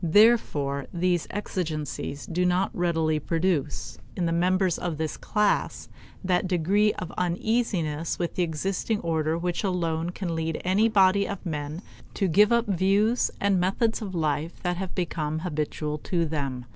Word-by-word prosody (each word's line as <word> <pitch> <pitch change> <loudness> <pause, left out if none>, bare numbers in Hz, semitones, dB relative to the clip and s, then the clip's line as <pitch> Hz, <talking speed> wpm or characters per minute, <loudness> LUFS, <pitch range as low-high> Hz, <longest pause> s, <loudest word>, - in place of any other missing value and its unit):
Therefore 160 - +3
these 175 -1 0
exigencies 155 -7 -4
do 180 +2 -1
not 180 +2 +2
readily 165 -3 +1
produce, 165 -2 -1 0.2
in 180 - -1
the 165 - 0
members 180 +1 +2
of 170 -3 -3
this 155 0 -2
class, 210 -2 0 0.3
that 180 0 +1
degree 195 +4 +2
of 180 - -6
uneasiness 175 -4 0
with 170 -1 -2
the - - -1
existing 185 +6 -1
order 160 -1 0
which 175 +2 -2
alone 170 -3 -1
can 180 -1 -4
lead 160 0 -2
any 200 +5 +3
body 200 -1 +4
of 200 -1 -6
men 150 +2 -4 0.3
to 195 - +1
give 205 +6 +5
up 235 0 +3
views 200 +5 +2
and 200 -2 +2
methods 210 +6 +1
of 195 -4 -5
life 155 0 -1
that 180 -1 0
have 190 -1 -5
become 160 -3 -2
habitual 150 -2 -2
to 170 +2 0
them. 140 -5 -3
175 Hz, 155 wpm, -26 LUFS, 160-195 Hz, 0.3 s, give